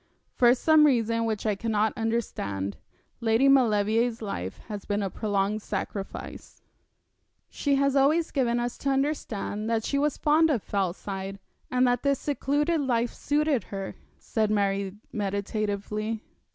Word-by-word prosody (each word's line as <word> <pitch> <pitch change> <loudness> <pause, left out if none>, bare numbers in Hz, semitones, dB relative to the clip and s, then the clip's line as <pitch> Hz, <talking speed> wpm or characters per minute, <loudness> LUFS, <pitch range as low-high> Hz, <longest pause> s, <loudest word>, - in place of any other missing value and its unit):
For 245 0 +5
some 310 +3 +5
reason 230 -3 +1
which 220 -2 -2
I 215 - +2
cannot 215 +1 0
understand, 100 - -2 0.4
Lady 230 +3 +3
Maulevrier's 230 -2 +3
life 95 - -4
has 210 -3 -5
been 205 0 -1
a 195 - -2
prolonged 205 +1 -1
sacrifice.' 200 -1 -6 0.9
'She 285 -1 +1
has 275 0 +2
always 305 +5 +3
given 240 -4 +1
us 240 0 -3
to 275 - -1
understand 265 -6 -1
that 225 -1 +1
she 280 - 0
was 295 +1 +1
fond 315 +2 +4
of 250 -9 0
Fellside, 195 0 -3 0.3
and 250 0 +3
that 245 -1 +2
this 280 -1 +2
secluded 295 +3 0
life 240 -3 0
suited 295 -3 0
her,' 195 -1 -6 0.2
said 220 -2 -1
Mary, 200 -2 0 0.2
meditatively. 210 +1 -2
225 Hz, 140 wpm, -27 LUFS, 205-270 Hz, 0.9 s, For